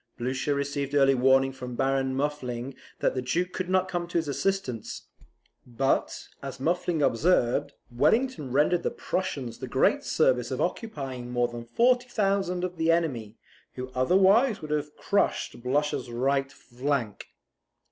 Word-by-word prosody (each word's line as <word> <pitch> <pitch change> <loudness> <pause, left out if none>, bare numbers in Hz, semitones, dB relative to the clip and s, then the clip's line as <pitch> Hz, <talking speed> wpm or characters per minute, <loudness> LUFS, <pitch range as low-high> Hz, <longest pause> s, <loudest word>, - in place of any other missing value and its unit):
Blucher 130 +4 -1
received 140 0 -2
early 135 -1 +5
warning 135 +1 +4
from 125 -2 -7
Baron 135 0 0
Muffling 135 -3 -3 0.3
that - - +2
the 130 - -2
Duke 175 +9 -1
could 185 -1 -3
not 185 0 +2
come 175 -2 -3
to 175 - -2
his 160 -2 0
assistance; 140 - -2 0.6
but, 130 +2 -1
as 135 -1 -7
Muffling 170 +1 0
observes, 125 -1 +2 0.2
Wellington 150 - +1
rendered 150 +6 +3
the - - 0
Prussians 140 -10 -3
the - - -5
great - - +2
service 125 -2 +2
of 130 - -3
occupying 135 - -3
more 120 0 +1
than 120 0 -7
40,000 200 - +1
of 180 -1 -3
the 165 0 +3
enemy, 125 -11 -1 0.4
who 130 0 -6
otherwise 195 - +4
would 155 -2 -7
have 150 0 -2
crushed 200 -10 0
Blucher's 140 +1 -1
right 135 +3 0
flank. 125 -4 -3
140 Hz, 145 wpm, -27 LUFS, 125-175 Hz, 0.6 s, early